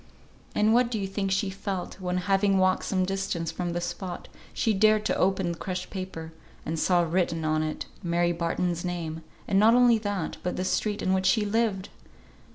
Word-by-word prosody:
And 215 +1 +3
what 240 0 +4
do 235 - -2
you 200 - -2
think 195 0 -2
she 195 +1 0
felt, 190 -1 -5
when, 180 0 -1
having 195 0 +3
walked 185 0 +2
some 185 -2 +1
distance 190 -3 -2
from 175 -1 -3
the 175 - -1
spot, 175 +1 -5 0.2
she 220 - +1
dared 215 +1 +4
to - - +1
open 190 -2 +1
the 170 - -6
crushed 185 -1 -4
paper, 175 -4 -6 0.3
and 160 +1 -2
saw 175 0 +3
written 165 -1 0
on 155 0 +1
it 155 0 -3 0.2
Mary 175 0 +1
Barton's 170 0 -1
name, 165 -3 -4 0.3
and 195 - +3
not 225 +3 +6
only 245 -2 +5
that, 205 -6 -3
but 180 - -2
the 185 - -2
street 210 +2 -1
in 185 - +2
which 190 0 +1
she 210 +2 +3
lived! 205 -2 0
185 Hz, 195 wpm, -27 LUFS, 175-205 Hz, 0.3 s, not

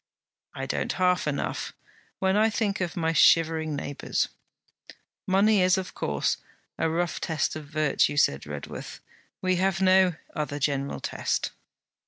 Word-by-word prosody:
'I - - -4
don't - - -2
half 180 -3 +2
enough, 145 -1 -2 0.4
when 190 0 +1
I 215 +2 +4
think 210 -3 -1
of 175 -1 -3
my 165 -1 +1
shivering 160 0 +4
neighbours.' 145 0 -2 1.0
'Money 200 +2 +4
is 185 +2 +4
of 190 -1 -4
course 70 -1 -1 0.4
a 160 - +2
rough 170 +1 -1
test 160 -2 -1
of 155 -2 -7
virtue,' 150 -1 +1
said 70 - +2
Redworth. 75 -1 -7 0.4
'We 185 -1 +2
have 190 0 +1
no 185 -1 +5 0.2
other 150 -2 -3
general 140 -1 -1
test.' - - -2
165 Hz, 140 wpm, -26 LUFS, 145-185 Hz, 1.0 s, no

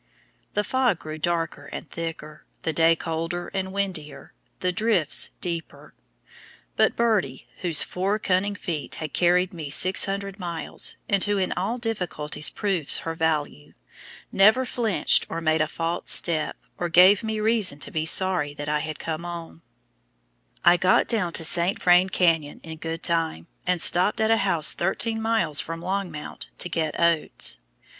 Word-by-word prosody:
The 210 - +1
fog 250 -5 +1
grew 155 0 -8
darker 165 0 -2
and - - -8
thicker, 165 -2 -7 0.2
the 160 - -2
day 165 +1 +4
colder 165 +2 -4
and 190 -1 -4
windier, 185 -7 -5 0.3
the 180 - 0
drifts 210 -6 +2
deeper; 170 -2 -5 0.8
but - - +2
Birdie, 200 - 0
whose 170 -5 +4
four 195 +3 -2
cunning 200 0 -1
feet 165 -6 -5
had 155 -2 -6
carried 180 +1 +2
me 160 -4 -7
600 195 +5 +3
miles, 170 -4 -4
and 200 -2 +1
who 205 0 0
in 185 -1 -1
all 195 +7 -2
difficulties 180 -10 -1
proves 190 -8 -1
her 165 - -3
value, 155 - -3 0.6
never 215 +7 +4
flinched 230 -6 +1
or 165 - -4
made 160 -1 +1
a 155 - +1
false 165 +2 -3
step, 160 -3 +3 0.2
or 175 - -2
gave 185 +5 +6
me 220 -1 -3
reason 215 -9 +2
to - - -5
be 155 -1 -2
sorry 175 -6 +4
that 145 0 -6
I 150 0 0
had 155 0 -5
come 160 0 -5
on. 170 - -8 1.0
I 175 +1 +6
got 185 +1 +3
down 205 -7 0
to - - +1
the - - +4
St. 175 +4 +2
Vrain 180 +1 +4
Canyon 165 -6 +1
in 160 -1 -9
good 165 +1 -5
time, 165 - -1 0.2
and 180 -1 +1
stopped 180 +6 +3
at 220 0 +2
a 225 - +4
house 190 -7 +1
thirteen 225 +5 -1
miles 220 -10 +1
from 165 0 -5
Longmount 180 -4 -5
to 180 - 0
get 160 -3 -2
oats. 170 -2 0
175 Hz, 160 wpm, -24 LUFS, 160-195 Hz, 1.0 s, gave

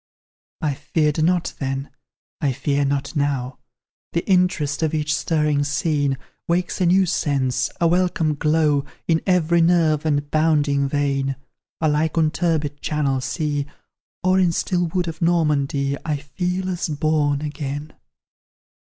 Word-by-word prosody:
I 150 -2 +1
feared 150 +2 0
not 175 +1 +1
then 135 0 -3 0.5
I 140 -3 +1
fear 140 +2 0
not 140 +2 -2
now; 140 -3 -1 0.5
The 170 - -1
interest 180 -7 +2
of 160 -1 0
each 150 0 0
stirring 150 -2 +1
scene 145 -2 0 0.3
Wakes 180 +2 0
a 180 - +4
new 190 +2 +4
sense, 140 -6 0
a 170 - +3
welcome 175 -3 +1
glow, 150 -1 +2 0.2
In 165 -1 +2
every 170 -2 +3
nerve 165 -3 +3
and 145 -2 0
bounding 150 -3 +2
vein; 140 -1 0 0.5
Alike 155 +1 +1
on 155 -1 +3
turbid 155 -4 -1
Channel 140 -4 0
sea, 145 +2 -2 0.6
Or 185 +1 +3
in 180 -2 +3
still 175 +1 0
wood 175 +1 -1
of 165 +1 -6
Normandy, 150 -4 +1
I 155 -2 -1
feel 180 +6 -3
as 180 -2 -2
born 150 -1 +1
again. 145 0 -5
150 Hz, 135 wpm, -22 LUFS, 145-165 Hz, 0.6 s, a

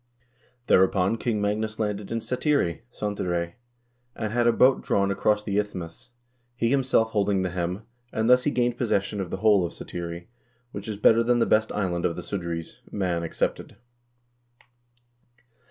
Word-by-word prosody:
Thereupon 95 +2 +3
King 115 -3 -1
Magnus 105 +1 -1
landed 105 -2 -3
in 115 0 -1
Satiri 125 - 0
(Cantire), 90 -6 -2 0.6
and 110 -1 -3
had 120 0 +2
a - - +6
boat 130 +3 +4
drawn 100 0 +1
across 105 +1 +1
the 105 -1 0
isthmus, 90 -3 -6 0.5
he 115 -1 0
himself 130 -5 +2
holding 100 -3 +1
the 90 - -2
helm, 90 +3 -3 0.3
and 110 0 0
thus 125 +1 +6
he - - +3
gained 120 -3 0
possession 105 -3 0
of 90 - -5
the - - -3
whole 105 -4 +6
of 85 - -3
Satiri, 85 0 -6 0.5
which 100 +1 -7
is 105 -2 -4
better 115 +2 +5
than 120 +1 +2
the 120 - +3
best 110 0 +2
island 90 -4 -1
of 85 - -4
the - - -6
Sudreys, 85 -4 -5
Man 90 -4 -1
excepted." 85 - -3
105 Hz, 160 wpm, -26 LUFS, 90-115 Hz, 0.6 s, a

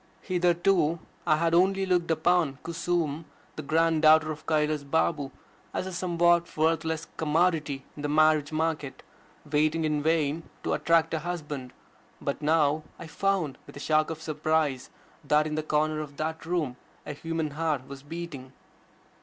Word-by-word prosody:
Hitherto 175 -2 +2 0.3
I 155 - +5
had 165 +1 +1
only 190 +2 +3
looked 180 -2 +1
upon 165 -3 +2
Kusum, 165 -2 -1 0.3
the - - -5
grand 160 +2 +2
daughter 155 0 +6
of 155 0 -9
Kailas 150 -1 +1
Babu, 145 -1 0 0.5
as - - -1
a 190 - -5
somewhat 175 -1 +2
worthless 160 0 +1
commodity 155 -3 +1
in 145 - -8
the 145 - -2
marriage 155 -1 +3
market, 155 -3 -2 0.4
waiting 155 +2 +1
in 150 -1 0
vain 160 0 +1 0.2
to - - 0
attract 165 -1 +2
a 160 - 0
husband. 150 -6 -5 0.5
But - - -3
now 155 0 +2 0.2
I - - -8
found, 175 -5 -1
with - - -11
a - - -7
shock 155 +1 +2
of 160 -1 -6
surprise, 155 -3 0 0.3
that 150 +1 +3
in 155 - -3
the 155 - 0
corner 155 0 0
of 145 -2 -7
that 160 +1 -4
room 155 -8 -1 0.3
a 150 - -5
human 160 0 -3
heart 150 -3 -2
was 140 -1 -9
beating. 145 -4 -7
155 Hz, 155 wpm, -27 LUFS, 150-165 Hz, 0.5 s, daughter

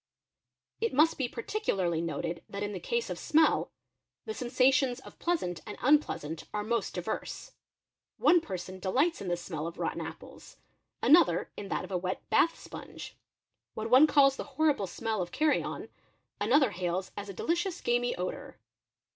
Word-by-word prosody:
— - - -50
It 455 - 0
must 310 +3 +4
be 255 -3 0
particularly 195 - -1
noted 170 0 -3
that 200 +1 -4
in 205 0 -3
the 185 - -4
case 470 - -2
of - - -4
smell, 315 0 +3 0.6
the 440 - -4
sens 250 - -6
ations 260 -1 +4
of - - -14
pleasant 320 - -1
and 210 - -6
unpleasant 245 - +1
are 210 - -1
most 235 +2 -1
diverse. - - -4 0.7
One 350 -1 +5
person 185 - -6
delights 265 - +1
in 195 - -5
the 175 -1 0
smell 165 -3 -5
of 170 - -8
rotten - - -2
apples, - - -10 0.5
another 335 +5 +5
in 200 - -6
that - - -2
of - - -9
a 180 - 0
wet 185 +1 -4
bath 330 - +4
sponge; - - -9 0.6
wha 220 - -4
one 255 +6 +7
calls 275 -2 +5
the - - -3
horrible 295 -11 +2
smell 220 +3 -2
of 175 - -4
carrion, 305 0 0 0.5
another 250 +3 +4
hails 180 +1 -2
as 205 0 -6
a - - -5
delicious 345 - -1
gamey 245 0 +1
odour. 180 +1 -5
230 Hz, 170 wpm, -30 LUFS, 185-300 Hz, 0.7 s, one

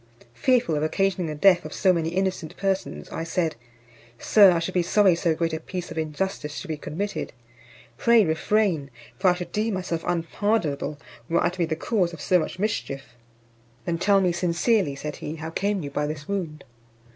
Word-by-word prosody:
Fearful 245 - +2
of 150 - 0
occasioning 185 +2 0
the 155 - -4
death 180 +3 +5
of - - -7
so 185 -2 +4
many 165 -2 0
innocent 185 -3 -2
persons, 190 - -2
I 165 - -3
said, 165 0 -1 0.6
"Sir, 200 - +6
I 175 - +2
should 165 +3 -2
be 180 - +3
sorry 190 +2 +4
so 165 -1 +1
great 165 0 -1
a 160 - -2
piece 180 +1 -6
of 165 - -7
injustice 155 -1 -3
should 190 - -7
be 155 - -1
committed. 160 +2 -4 0.7
Pray 235 -3 +5
refrain; 165 -2 +1 0.3
for 185 -1 +4
I 180 - +3
should 175 -1 -6
deem 215 0 0
myself 175 -3 -3
unpardonable, 170 -4 -1 0.3
were 170 - +2
I - - +3
to 180 - -10
be 170 - +3
the 160 0 -2
cause 180 0 0
of 165 - -9
so 180 - +3
much 160 - -4
mischief." 185 -9 -3 0.8
"Then 170 -1 -1
tell 195 +2 +4
me 180 -2 +2
sincerely," 175 - +1
said 150 +2 -6
he, 155 - -5
"how 160 0 -6
came 200 +1 -1
you 140 - -5
by 150 +1 -1
this 150 -1 -6
wound." 175 -7 -3
175 Hz, 195 wpm, -25 LUFS, 160-195 Hz, 0.8 s, Sir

